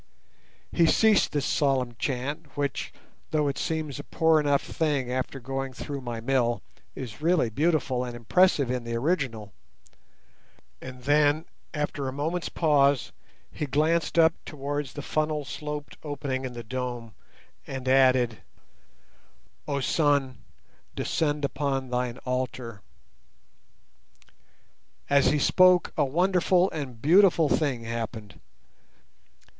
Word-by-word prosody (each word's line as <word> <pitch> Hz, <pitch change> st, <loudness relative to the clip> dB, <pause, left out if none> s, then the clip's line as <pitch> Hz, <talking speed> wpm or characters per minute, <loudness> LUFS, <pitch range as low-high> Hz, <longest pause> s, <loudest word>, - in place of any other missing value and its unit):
He 170 Hz, -1 st, +3 dB
ceased 220 Hz, +3 st, +4 dB
this 145 Hz, -1 st, -1 dB
solemn 130 Hz, -4 st, +1 dB
chant, 145 Hz, +3 st, -4 dB
which, 140 Hz, -2 st, -2 dB, 0.4 s
though 150 Hz, -2 st, +1 dB
it 140 Hz, -, -2 dB
seems 155 Hz, -4 st, -3 dB
a -, -, -6 dB
poor 160 Hz, 0 st, +3 dB
enough 145 Hz, -2 st, +2 dB
thing 145 Hz, -6 st, -1 dB
after 130 Hz, +2 st, -3 dB
going 135 Hz, +1 st, -4 dB
through 140 Hz, +1 st, -6 dB
my 120 Hz, -2 st, -5 dB
mill, 120 Hz, -1 st, 0 dB, 0.3 s
is 125 Hz, -1 st, -8 dB
really 160 Hz, -8 st, +2 dB
beautiful 140 Hz, -2 st, +1 dB
and 120 Hz, -1 st, -6 dB
impressive 140 Hz, -, +3 dB
in 125 Hz, -1 st, -2 dB
the 115 Hz, 0 st, -4 dB
original; 115 Hz, -, -1 dB, 1.3 s
and 125 Hz, -1 st, -9 dB
then, 145 Hz, +3 st, +3 dB, 0.3 s
after 145 Hz, -2 st, -3 dB
a -, -, -2 dB
moment's 160 Hz, +6 st, -2 dB
pause, 140 Hz, -5 st, +2 dB, 0.4 s
he 150 Hz, -, -4 dB
glanced 160 Hz, +5 st, +1 dB
up 165 Hz, 0 st, +6 dB
towards 145 Hz, -1 st, -4 dB
the 145 Hz, -, -6 dB
funnel 155 Hz, -1 st, -1 dB
sloped 150 Hz, +3 st, -6 dB
opening 140 Hz, -3 st, -3 dB
in 125 Hz, -, -5 dB
the 120 Hz, -1 st, -7 dB
dome 120 Hz, -1 st, -5 dB, 0.5 s
and 130 Hz, -1 st, -6 dB
added— 130 Hz, -4 st, +4 dB, 1.3 s
Oh 140 Hz, -1 st, -1 dB
Sun, 140 Hz, -2 st, +1 dB, 0.6 s
descend 150 Hz, -2 st, 0 dB
upon 135 Hz, -2 st, -2 dB
thine 125 Hz, -1 st, -1 dB
Altar! 125 Hz, -4 st, -3 dB, 2.3 s
As 140 Hz, -1 st, +5 dB
he 150 Hz, -, +3 dB
spoke 180 Hz, +4 st, +4 dB
a -, -, +2 dB
wonderful 180 Hz, +4 st, +2 dB
and 145 Hz, -4 st, -4 dB
a -, -, -13 dB
beautiful 165 Hz, -, +4 dB
thing 135 Hz, -7 st, 0 dB
happened. 115 Hz, -2 st, -6 dB
140 Hz, 125 wpm, -27 LUFS, 125-155 Hz, 2.3 s, up